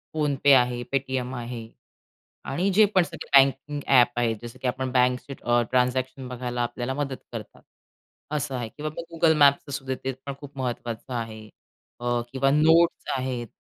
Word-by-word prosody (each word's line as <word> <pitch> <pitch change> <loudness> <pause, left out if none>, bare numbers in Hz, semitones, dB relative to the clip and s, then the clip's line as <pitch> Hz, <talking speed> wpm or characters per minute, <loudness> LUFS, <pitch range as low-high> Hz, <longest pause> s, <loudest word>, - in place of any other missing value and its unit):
PhonePe 145 -2 +3
आहे, 125 0 -1
Paytm 130 -2 -1
आहे 120 -1 -6 0.8
आणि 175 +8 0
जे 215 - +8
पण 185 - +6
सगळे - - -9 0.2
बँकिंग 145 +2 -5
ॲप 125 -3 +5
आहेत, 115 -2 +1
जसं 120 -1 -9
की - - -4
आपण 130 +1 -2
बँकची 125 +2 +1 0.4
ट्रान्झॅक्शन 130 +1 0
बघायला 125 -1 -3
आपल्याला 120 +2 -3
मदत 140 -2 -2 0.2
करतात, - - -8 0.7
असं 150 -2 -2
आहे, 120 -2 -4
किंवा 155 +6 -5
मग 170 0 -8
Google 160 -1 +4
Mapsचं 140 0 +4
सुद्धा 135 -1 -3
ते 135 - -1
पण 140 - -4
खूप 145 -1 -11
महत्त्वाचं 120 -1 -4
आहे, 110 -2 -5 0.5
अ, 120 0 0
किंवा 135 +1 +2
Notes 160 +4 +4
आहेत. 130 -2 -3
130 Hz, 160 wpm, -25 LUFS, 120-140 Hz, 0.8 s, जे